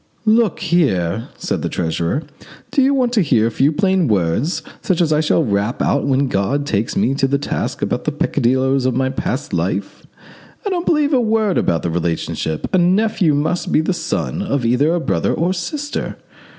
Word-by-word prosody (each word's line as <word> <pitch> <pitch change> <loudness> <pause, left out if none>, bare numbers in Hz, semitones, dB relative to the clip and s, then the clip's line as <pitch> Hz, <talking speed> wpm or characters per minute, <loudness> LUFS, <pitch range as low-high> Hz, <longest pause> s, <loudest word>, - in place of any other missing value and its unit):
"Look 220 -3 +2
here," 110 - +1
said - - -3
the - - -2
treasurer, 85 - -1 0.5
"do 280 - +3
you 270 +1 +4
want 255 -3 +1
to 220 - +3
hear 125 -9 +2
a 115 - 0
few 135 +6 +2
plain 190 0 +1
words, 105 - 0 0.2
such 185 - 0
as 160 -3 +2
I 150 - +2
shall 160 +1 +2
rap 105 +2 -1
out 140 - +1
when 135 0 +2
God 130 +7 0
takes 110 -5 -1
me 115 +7 +2
to 135 -1 +1
task 140 - -3
about - - -2
the - - 0
peccadilloes 130 +2 +1
of 130 - 0
my 130 0 +1
past 135 -2 -3
life? 95 +3 -3 0.6
I - - 0
don't 350 -1 -2
believe 300 -2 +2
a 255 - +4
word 220 -4 +1
about 85 - 0
the 85 - -1
relationship. 80 -2 -2
A 185 - +4
nephew 185 -3 +2
must 155 +5 -1
be - - +4
the 170 +4 0
son 170 +2 -3
of 140 -11 -1
either 125 +7 +2
a - - 0
brother - - 0
or 170 +3 0
a - - +1
sister. 290 - -4
145 Hz, 195 wpm, -18 LUFS, 115-185 Hz, 0.6 s, you